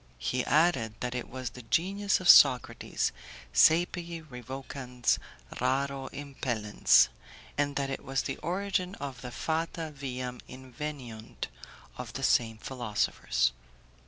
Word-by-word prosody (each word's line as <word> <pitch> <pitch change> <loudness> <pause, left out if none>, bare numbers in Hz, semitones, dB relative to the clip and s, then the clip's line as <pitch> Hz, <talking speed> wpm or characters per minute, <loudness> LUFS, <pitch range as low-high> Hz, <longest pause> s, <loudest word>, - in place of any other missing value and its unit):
'" - - -29
He 125 0 0
added 145 -9 +3
that 125 0 -2
it 125 -1 -4
was 130 -1 -5
the 125 - -10
genius 195 - +1
of 185 - -3
Socrates, 130 -6 +6 0.4
'saepe 170 - +3
revocans, 125 0 -2 0.4
raro 135 +1 0
impellens'; 120 - +2 0.5
and 145 0 0
that 135 -1 -1
it - - -4
was 135 +1 -1
the - - -3
origin 185 +2 -1
of 140 -3 -6
the 125 - -6
'fata 160 +3 -2
viam 125 -2 -5
inveniunt' 130 -3 -7 0.5
of - - -6
the - - -5
same 115 -2 +3
philosophers. 105 - 0
135 Hz, 125 wpm, -30 LUFS, 125-155 Hz, 0.5 s, Socrates